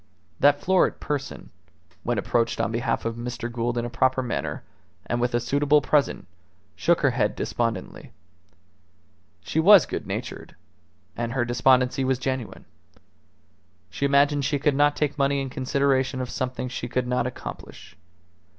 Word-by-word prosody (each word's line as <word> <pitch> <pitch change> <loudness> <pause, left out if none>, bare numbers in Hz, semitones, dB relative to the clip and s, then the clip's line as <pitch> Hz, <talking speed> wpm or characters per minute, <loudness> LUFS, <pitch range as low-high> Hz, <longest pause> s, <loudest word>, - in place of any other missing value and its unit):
That 145 0 +4
florid 190 0 +2
person, 145 -2 -5 0.5
when 120 -2 -1
approached 115 +2 0
on 100 - 0
behalf 115 0 -1
of 115 0 -3
Mr. 120 0 -5
Gould 120 0 -2
in 120 - -1
a - - -4
proper 130 +2 +1
manner, 120 - -4 0.4
and 120 0 -2
with 120 0 0
a - - +3
suitable 145 +5 +2
present, 145 0 +1 0.5
shook - - +2
her - - +3
head - - 0
despondently. 115 -5 -3 1.3
She 160 - -2
was 195 +2 +8
good - - -5
natured, - - -6 0.6
and 120 0 -3
her 130 -3 0
despondency 125 +2 +2
was 130 0 +1
genuine. 130 -2 -4 1.3
She 140 - -2
imagined 140 +1 +3
she 145 +2 0
could 145 +1 +1
not 145 +1 +3
take 150 -1 -2
money 140 0 +2
in 135 -1 -4
consideration 135 0 0
of 125 -1 -4
something 130 0 -3
she 120 -1 -5
could 125 +1 -1
not 125 0 0
accomplish. 125 - -9
130 Hz, 150 wpm, -25 LUFS, 120-140 Hz, 1.3 s, was